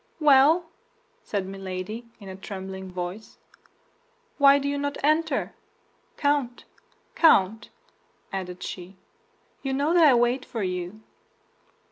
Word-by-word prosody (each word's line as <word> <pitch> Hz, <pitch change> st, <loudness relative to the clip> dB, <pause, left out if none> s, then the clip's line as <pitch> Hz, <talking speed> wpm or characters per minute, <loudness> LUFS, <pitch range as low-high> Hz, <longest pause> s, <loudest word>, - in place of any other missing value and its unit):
"Well," 300 Hz, +3 st, +5 dB, 0.6 s
said 200 Hz, -, -3 dB
Milady, 195 Hz, +4 st, -6 dB
in 200 Hz, -, -12 dB
a 190 Hz, -, -7 dB
trembling 190 Hz, -1 st, -7 dB
voice, 180 Hz, +4 st, -6 dB, 1.0 s
"why 280 Hz, 0 st, +7 dB
do 280 Hz, 0 st, -2 dB
you 285 Hz, 0 st, -1 dB
not 285 Hz, 0 st, -3 dB
enter? 310 Hz, 0 st, +1 dB, 0.6 s
Count, 285 Hz, -5 st, 0 dB, 0.5 s
Count," 220 Hz, -, +4 dB, 0.6 s
added 180 Hz, -1 st, -5 dB
she, 185 Hz, +1 st, -8 dB, 0.6 s
"you 270 Hz, -1 st, -3 dB
know 285 Hz, +5 st, +1 dB
that 345 Hz, -1 st, +5 dB
I 265 Hz, -, +6 dB
wait 240 Hz, +2 st, +2 dB
for 225 Hz, -4 st, -5 dB
you." 180 Hz, +3 st, -4 dB
225 Hz, 115 wpm, -25 LUFS, 190-285 Hz, 1.0 s, why